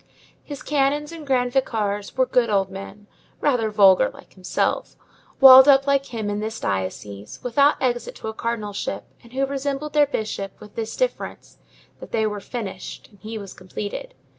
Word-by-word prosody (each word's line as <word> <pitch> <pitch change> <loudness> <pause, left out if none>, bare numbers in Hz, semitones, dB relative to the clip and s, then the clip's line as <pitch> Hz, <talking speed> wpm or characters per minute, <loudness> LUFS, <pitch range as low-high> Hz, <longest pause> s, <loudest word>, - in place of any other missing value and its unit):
His 285 -2 -8
canons 295 +1 0
and 320 -3 -9
grand 250 -2 +1
vicars 210 -6 -1
were 260 - +4
good 250 -2 +2
old 195 -2 +1
men, 195 +2 -9 0.3
rather 245 -6 +1
vulgar 195 -3 +5
like - - -16
himself, 185 -1 -2 0.4
walled 265 0 +10
up 275 -1 +6
like 275 -1 +2
him 220 -3 -4
in 205 0 -2
this 220 +1 -4
diocese, 100 +2 -4
without 280 +4 +3
exit 240 -2 -1
to - - -8
a 220 - -3
cardinalship, 215 -3 -3 0.2
and 235 - -18
who 270 +1 +1
resembled 280 +2 -3
their 295 -1 +4
bishop, 215 -6 -4
with 210 -1 -13
this 225 -1 -4
difference, - - -3 0.4
that - - -10
they 220 -1 +1
were 210 -1 -2
finished 195 -4 -7
and 205 - -21
he 220 +2 -6
was 200 -2 -8
completed. 205 - -7
230 Hz, 170 wpm, -23 LUFS, 205-275 Hz, 0.4 s, walled